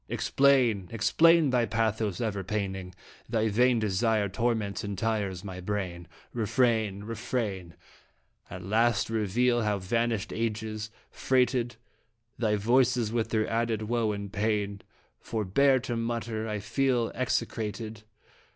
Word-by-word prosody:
Explain, 125 Hz, -9 st, +3 dB
explain 160 Hz, +6 st, +4 dB
thy 125 Hz, -2 st, +3 dB
pathos 110 Hz, -3 st, 0 dB
ever 105 Hz, -4 st, -2 dB
paining 95 Hz, -2 st, -4 dB, 0.3 s
Thy 110 Hz, -1 st, +1 dB
vain 120 Hz, +3 st, +3 dB
desire 110 Hz, 0 st, +1 dB
torments 110 Hz, 0 st, -1 dB
and 100 Hz, -2 st, -4 dB
tires 100 Hz, -4 st, -1 dB
my 95 Hz, -2 st, -7 dB
brain. 90 Hz, -3 st, -4 dB, 0.3 s
Refrain! 110 Hz, -3 st, +1 dB
Refrain! 105 Hz, -6 st, -3 dB, 0.7 s
At 90 Hz, -, -8 dB
last 115 Hz, +4 st, +1 dB
reveal 120 Hz, +3 st, +1 dB
how 105 Hz, -2 st, +1 dB
vanished 115 Hz, +2 st, -1 dB
ages 110 Hz, -1 st, -3 dB, 0.2 s
freighted 125 Hz, -2 st, +1 dB, 0.6 s
Thy 110 Hz, -3 st, +2 dB
voices 120 Hz, +1 st, +2 dB
with 115 Hz, -1 st, 0 dB
their 110 Hz, -1 st, +1 dB
added 115 Hz, -1 st, -1 dB
woe 115 Hz, 0 st, 0 dB
and 100 Hz, -1 st, -6 dB
pain; 100 Hz, -1 st, -1 dB, 0.4 s
Forbear 115 Hz, +6 st, +2 dB
to 120 Hz, -1 st, -3 dB
mutter 115 Hz, -1 st, -2 dB
I 105 Hz, -, -2 dB
feel 120 Hz, +1 st, 0 dB
execrated. 110 Hz, -3 st, -2 dB
110 Hz, 120 wpm, -28 LUFS, 100-120 Hz, 0.7 s, explain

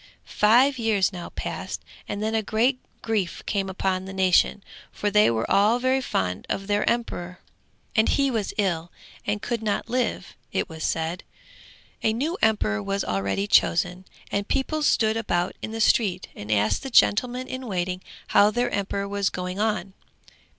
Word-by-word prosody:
Five 250 Hz, +6 st, +4 dB
years 210 Hz, -4 st, +2 dB
now 175 Hz, -1 st, -6 dB
passed, -, -, -5 dB, 0.2 s
and 205 Hz, +1 st, -3 dB
then 220 Hz, +1 st, -1 dB
a 220 Hz, -, +2 dB
great 235 Hz, +5 st, +1 dB, 0.2 s
grief 210 Hz, -6 st, -1 dB
came 195 Hz, -2 st, -1 dB
upon 190 Hz, 0 st, -1 dB
the 190 Hz, -, -7 dB
nation, 190 Hz, +1 st, +3 dB, 0.3 s
for 205 Hz, -, -2 dB
they 210 Hz, +1 st, +5 dB
were 115 Hz, -1 st, 0 dB
all 210 Hz, +4 st, +4 dB
very 260 Hz, +1 st, +1 dB
fond 95 Hz, -, -2 dB
of 195 Hz, -, -2 dB
their 205 Hz, +1 st, +1 dB
emperor, 180 Hz, -7 st, -3 dB, 0.6 s
and 220 Hz, -, +4 dB
he 275 Hz, -1 st, +2 dB
was 220 Hz, -4 st, -1 dB
ill 175 Hz, -4 st, 0 dB, 0.4 s
and 205 Hz, 0 st, -1 dB
could 235 Hz, -2 st, -2 dB
not 215 Hz, +1 st, -2 dB
live, 245 Hz, -7 st, -1 dB, 0.2 s
it -, -, -1 dB
was 160 Hz, -1 st, -8 dB
said. 165 Hz, +2 st, -1 dB, 0.8 s
A 220 Hz, -, +2 dB
new 295 Hz, +10 st, -1 dB
emperor 155 Hz, -, +2 dB
was 195 Hz, -, -1 dB
already 100 Hz, -, -1 dB
chosen, 180 Hz, -1 st, +2 dB, 0.3 s
and 200 Hz, 0 st, -1 dB
people 305 Hz, +3 st, -1 dB
stood 220 Hz, -6 st, +3 dB
about 175 Hz, -5 st, -1 dB
in -, -, -4 dB
the 225 Hz, +1 st, -5 dB
street, 200 Hz, -5 st, +2 dB
and 105 Hz, +1 st, -6 dB
asked 105 Hz, 0 st, +2 dB
the 270 Hz, -, -5 dB
gentleman 250 Hz, +2 st, +3 dB
in 255 Hz, -1 st, -6 dB
waiting 185 Hz, -2 st, -2 dB, 0.3 s
how 205 Hz, +1 st, +6 dB
their 240 Hz, +3 st, 0 dB
emperor 200 Hz, 0 st, -2 dB
was 200 Hz, -1 st, 0 dB
going 180 Hz, +1 st, -5 dB
on. 210 Hz, -3 st, -1 dB
205 Hz, 170 wpm, -25 LUFS, 180-225 Hz, 0.8 s, how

